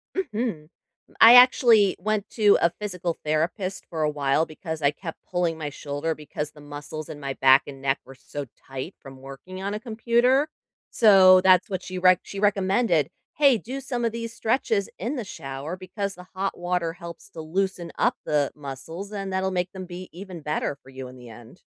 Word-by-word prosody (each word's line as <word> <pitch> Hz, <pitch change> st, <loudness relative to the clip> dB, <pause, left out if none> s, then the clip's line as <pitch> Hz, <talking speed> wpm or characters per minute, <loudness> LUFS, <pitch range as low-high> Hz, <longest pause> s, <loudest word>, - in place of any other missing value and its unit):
Mhm. 225 Hz, -, -3 dB, 0.5 s
I 230 Hz, +2 st, +10 dB
actually 240 Hz, -5 st, +6 dB
went 210 Hz, +1 st, -1 dB
to 210 Hz, -3 st, +5 dB
a 170 Hz, -, +5 dB
physical 180 Hz, -5 st, -3 dB
therapist 175 Hz, +5 st, -1 dB
for 160 Hz, -2 st, -4 dB
a 150 Hz, -, +2 dB
while 145 Hz, +1 st, +1 dB
because 160 Hz, 0 st, -7 dB
I 140 Hz, -, +3 dB
kept 165 Hz, +2 st, -8 dB
pulling 175 Hz, -3 st, 0 dB
my 150 Hz, -2 st, -4 dB
shoulder 145 Hz, +3 st, -3 dB
because 150 Hz, 0 st, -6 dB
the 150 Hz, -, -16 dB
muscles 145 Hz, +1 st, -8 dB
in 145 Hz, -, -8 dB
my 140 Hz, -1 st, -4 dB
back 135 Hz, +1 st, +5 dB
and 135 Hz, -1 st, -9 dB
neck 135 Hz, 0 st, 0 dB
were 135 Hz, 0 st, -13 dB
so 145 Hz, +2 st, -7 dB, 0.2 s
tight 135 Hz, +7 st, -6 dB
from 135 Hz, -2 st, -12 dB
working 160 Hz, +8 st, -9 dB
on 200 Hz, +1 st, -3 dB
a 210 Hz, -, -3 dB
computer, 240 Hz, +5 st, +2 dB, 0.4 s
so, 190 Hz, -4 st, +7 dB
that's 185 Hz, 0 st, +5 dB
what 190 Hz, -2 st, -3 dB
she 185 Hz, -, -6 dB
rec 185 Hz, -1 st, +5 dB
she 200 Hz, -, -9 dB
recommended, 195 Hz, -4 st, +2 dB, 0.3 s
"Hey, 280 Hz, -5 st, +5 dB
do 260 Hz, +6 st, -6 dB
some 245 Hz, -2 st, -3 dB
of 230 Hz, -, +1 dB
these 230 Hz, 0 st, -5 dB
stretches 220 Hz, -4 st, 0 dB
in 240 Hz, +10 st, -3 dB
the 240 Hz, -, -3 dB
shower 140 Hz, -1 st, -6 dB
because 195 Hz, +1 st, -5 dB
the 180 Hz, 0 st, -13 dB
hot 195 Hz, +1 st, -2 dB
water 175 Hz, -2 st, -1 dB
helps 170 Hz, -1 st, -10 dB
to 160 Hz, -, -10 dB
loosen 175 Hz, +1 st, -2 dB
up 245 Hz, +1 st, +2 dB
the 145 Hz, -2 st, +1 dB
muscles, 150 Hz, +8 st, -8 dB
and 195 Hz, -2 st, -4 dB
that'll 190 Hz, 0 st, 0 dB
make 180 Hz, 0 st, -1 dB
them 190 Hz, -1 st, -7 dB
be 180 Hz, +1 st, -8 dB
even 180 Hz, -1 st, -9 dB
better 150 Hz, -1 st, -2 dB
for 135 Hz, -1 st, -19 dB
you 130 Hz, -1 st, -8 dB
in 130 Hz, -, -12 dB
the 125 Hz, -1 st, -12 dB
end". 120 Hz, +9 st, -14 dB
180 Hz, 195 wpm, -25 LUFS, 150-205 Hz, 0.5 s, I